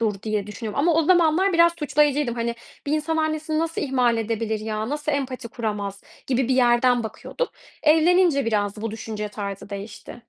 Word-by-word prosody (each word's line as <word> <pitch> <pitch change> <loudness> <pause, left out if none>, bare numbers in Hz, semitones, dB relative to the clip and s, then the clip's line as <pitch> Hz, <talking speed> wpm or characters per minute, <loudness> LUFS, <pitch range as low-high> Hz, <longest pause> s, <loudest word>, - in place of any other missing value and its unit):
dur 210 -4 -1
diye 215 -2 -2
düşünüyorum 215 +4 -4
ama 335 +3 +3
o 325 - +4
zamanlar 350 +2 +3
biraz 340 0 +5
suçlayıcıydım. 295 -4 +1
Hani, 235 0 -2 0.3
"Bir 290 - -1
insan 310 +1 0
annesini 310 0 -1
nasıl 330 0 -1
ihmal 250 -4 +2
edebilir 220 -1 -2
ya? 215 +1 -3
Nasıl 295 +1 -2
empati 260 -4 -3
kuramaz?" 205 -4 -4 0.3
gibi 260 -1 0
bir 260 - +3
yerden 245 -1 +4
bakıyordum. 225 - -4 0.3
Evlenince 320 -1 +4
biraz 210 -2 -1
bu 225 - -2
düşünce 215 -1 -5
tarzı 200 -1 -6
değişti. 200 +2 -8
245 Hz, 170 wpm, -23 LUFS, 215-310 Hz, 0.3 s, biraz